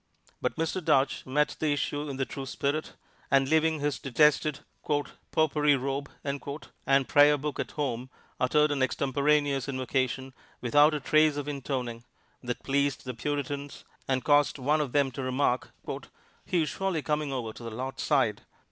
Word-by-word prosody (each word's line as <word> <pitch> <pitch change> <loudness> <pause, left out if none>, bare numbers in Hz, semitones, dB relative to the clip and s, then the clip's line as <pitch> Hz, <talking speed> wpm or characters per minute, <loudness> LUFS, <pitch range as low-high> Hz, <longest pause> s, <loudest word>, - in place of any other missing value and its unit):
But - - -1
Mr. 165 +3 -2
Duche 140 -5 +2
met 150 +3 +1
the 155 -2 +1
issue 145 +1 -2
in 135 - -5
the 135 - 0
true 135 0 -6
spirit, 145 +4 -2 0.4
and 135 -1 +4
leaving 160 +1 +2
his 145 -2 -1
detested 150 +2 +2 0.7
"popery 150 -2 +3
robe" 140 +2 -3
and 140 -1 -1
prayer 145 0 +6
book 145 0 -4
at - - -3
home 130 -4 -2 0.3
uttered 150 +4 +3
an 140 -2 -1
extemporaneous 140 +1 +1
invocation, 130 0 -1 0.3
without 145 +5 +4
a - - -1
trace 155 +2 +3
of 145 -1 -4
intoning, 125 -4 -3 0.4
that 125 -1 -4
pleased 140 0 0
the 125 - -4
Puritans 145 +2 -4 0.2
and 130 -1 0
caused 145 0 +4
one 145 +4 +2
of 140 -4 -2
them 140 -2 +3
to 130 - -5
remark, 130 -1 0 0.8
"He 175 -3 +2
is 150 - -2
surely 190 -6 -2
coming 150 -2 -1
over 120 -4 -3
to - - -12
the 115 - -5
Lord's 130 +4 -5
side!" - - +2
140 Hz, 160 wpm, -28 LUFS, 130-150 Hz, 0.8 s, prayer